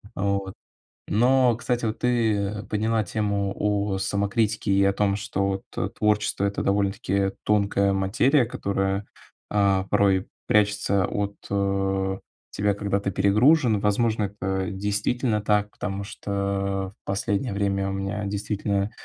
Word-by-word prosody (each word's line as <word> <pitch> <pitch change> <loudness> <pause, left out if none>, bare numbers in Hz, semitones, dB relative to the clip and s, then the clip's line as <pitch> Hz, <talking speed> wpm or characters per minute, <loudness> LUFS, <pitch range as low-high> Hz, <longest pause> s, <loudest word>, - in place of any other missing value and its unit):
Вот. 100 -1 -1 0.6
Но, 125 +2 +4
кстати, 120 -1 -1
вот 110 - -2
ты 105 -4 0
подняла 110 +1 +1
тему 100 -2 -1
о 105 -1 0
самокритике 100 +2 0
и 100 0 +4
о 100 - +3
том, 100 -1 +1
что 100 -2 -1
вот, 95 0 -2
э, - - -1
творчество- 105 -1 +1
это 100 - -1
довольно-таки 100 -1 0
тонкая 100 -1 +2
материя, 120 +8 +2
которая, 100 -2 -2 0.5
а, 100 -2 +3
порой 95 -2 +2 0.2
прячется 100 -2 +2
от, 100 0 -2 0.2
э, 95 -1 0 0.3
тебя, 100 0 +1
когда 100 0 -1
ты 100 -1 -2
перегружен. 110 - +4
Возможно, 110 +1 +1
это 95 -1 -3
действительно 105 +4 -1
так, 105 0 +1
потому 100 0 -4
что 100 -2 -3
в - - -75
последнее 100 +4 -1
время 100 -1 0
у - - -3
меня 95 +2 -3
действительно 100 0 -1
100 Hz, 130 wpm, -25 LUFS, 100-105 Hz, 0.6 s, Но